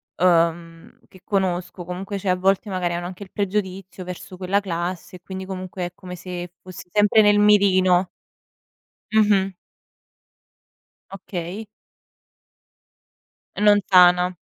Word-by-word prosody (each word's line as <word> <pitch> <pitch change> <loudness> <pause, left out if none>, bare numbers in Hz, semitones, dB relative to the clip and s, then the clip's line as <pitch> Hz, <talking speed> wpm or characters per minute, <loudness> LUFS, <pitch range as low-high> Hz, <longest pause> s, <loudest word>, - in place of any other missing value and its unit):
uhm, 165 -1 0
che 185 - -18
conosco, 185 -3 -2
comunque, 190 +3 -5
cioè, 195 -1 -3
a 180 - +3
volte, 195 +3 +1
magari, 180 -2 -1
hanno 175 +1 -4
anche 185 +3 -7
il 190 - -15
pregiudizio 190 -2 -3
verso 180 0 -8
quella 190 +2 0
classe, 180 -1 -5
e - - -26
quindi, 190 +1 -7
comunque, 185 -1 -5
è - - -11
come 180 -1 -9
se 175 0 -7
fossi 185 -1 -11
sempre 210 +2 +4
nel 205 0 +4
mirino. 190 -3 +4 1.0
Mh-mh. 205 -3 +3 1.6
Okay. 195 +2 -6 1.9
Non 210 0 +5
sana. 180 -1 +5
185 Hz, 120 wpm, -22 LUFS, 180-195 Hz, 1.9 s, Non